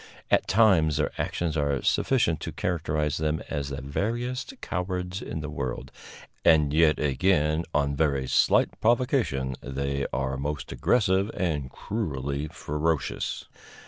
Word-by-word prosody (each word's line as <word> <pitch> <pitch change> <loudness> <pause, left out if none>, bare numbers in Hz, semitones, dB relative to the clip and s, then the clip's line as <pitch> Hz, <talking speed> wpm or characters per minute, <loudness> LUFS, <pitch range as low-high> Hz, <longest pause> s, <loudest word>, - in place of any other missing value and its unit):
At - - +3
times 95 -8 +4
their 75 - 0
actions 85 -3 -2
are 70 -3 0
sufficient 100 - +2
to - - -5
characterize 75 -4 -1
them 80 0 0
as 70 -1 -3
the 70 -1 -5
veriest 120 - -3
cowards 90 0 -3
in 80 - -5
the 75 - -5
world, 65 -1 -4 0.5
and 75 -3 +5
yet 80 -1 +4
again, 75 +2 +1
on 70 -2 +1
very 70 -3 +1
slight - - +3
provocation, 115 - +1
they 70 +1 -2
are 65 0 -1
most 70 +2 -4
aggressive 100 -4 +2
and 75 -7 -1
cruelly 70 - -3
ferocious. 75 0 -2
75 Hz, 130 wpm, -27 LUFS, 70-90 Hz, 0.5 s, and